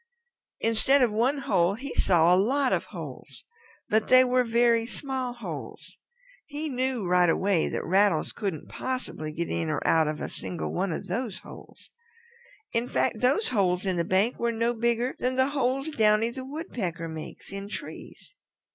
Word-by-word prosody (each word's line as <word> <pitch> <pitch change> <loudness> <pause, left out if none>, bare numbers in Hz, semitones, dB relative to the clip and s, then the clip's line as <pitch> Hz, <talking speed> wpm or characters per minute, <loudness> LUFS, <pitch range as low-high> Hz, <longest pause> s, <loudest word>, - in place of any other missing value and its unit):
Instead 250 +5 +3
of 240 - +2
one 240 +7 +1
hole 195 -9 +1
he 265 +4 -7
saw 175 -1 +4
a - - +6
lot 255 +8 +2
of - - 0
holes, - - -10 0.4
but 215 0 +1
they 255 0 +8
were 250 0 +2
very 235 0 +3
small 260 -1 -4
holes. 240 -1 -8 0.5
He 300 +1 -4
knew 255 -4 -1
right 180 -1 +4
away 185 0 +1
that - - -3
Rattles 190 -3 +2
couldn't 195 -9 -4
possibly 255 -12 -4
get 170 +2 -3
in 165 -1 -1
or 150 - 0
out 160 -1 +4
of 150 0 -3
a - - -3
single 175 - -5
one 190 +1 -1
of 160 - -4
those 200 +1 -3
holes. - - -13 0.8
In 230 +1 0
fact, 225 - 0
those 265 - +2
holes 190 -5 +1
in 185 -2 0
the 170 - +1
bank 190 +7 +1
were 235 0 +1
no 230 +1 0
bigger 235 +2 0
than 255 +1 0
the 260 +1 +3
holes 275 +1 0
Downy 220 -4 +3
the 260 +1 -7
Woodpecker 235 - -4
makes 160 +2 -9
in 195 +1 -6
trees. 215 - -9
230 Hz, 175 wpm, -27 LUFS, 185-255 Hz, 0.8 s, they